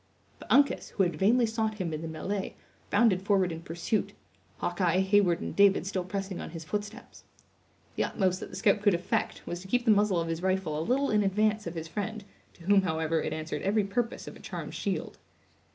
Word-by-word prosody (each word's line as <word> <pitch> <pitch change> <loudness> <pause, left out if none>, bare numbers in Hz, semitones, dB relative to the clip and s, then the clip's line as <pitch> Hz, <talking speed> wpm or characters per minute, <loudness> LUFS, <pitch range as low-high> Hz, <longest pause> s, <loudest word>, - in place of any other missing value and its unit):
But - - -10
Uncas, 285 0 +4
who 195 - +1
had 175 -3 0
vainly 230 +8 +4
sought 220 -1 -1
him 180 -6 -3
in 155 - -4
the 165 - -4
melee, 190 +5 -4 0.3
bounded 205 -3 +3
forward 195 -2 +2
in 165 0 -6
pursuit; 175 +6 -2 0.4
Hawkeye, 175 0 +1
Heyward 190 -3 +3
and - - -5
David 200 -2 +5
still 190 -1 -2
pressing 195 0 -4
on - - -6
his 165 0 -7
footsteps. 210 +7 -6 0.7
The - - +1
utmost 185 -2 0
that - - -7
the - - -9
scout 205 -2 +2
could 205 -3 +4
effect, 170 - -2
was 175 - -4
to 190 - -11
keep 245 +4 +1
the 225 - +6
muzzle 205 -3 +3
of 165 - -2
his 165 0 -3
rifle 185 -5 0
a - - -1
little 260 +11 +1
in 210 -1 +3
advance 210 +1 +1
of 170 - -5
his 165 0 -5
friend, 215 +4 -4 0.3
to 170 - -17
whom, 200 +2 +5
however, 160 -2 0
it - - -3
answered 155 -1 -4
every 205 +2 +2
purpose 230 +4 -2
of - - -8
a - - -13
charmed - - -6
shield. - - -3
195 Hz, 215 wpm, -29 LUFS, 170-210 Hz, 0.7 s, the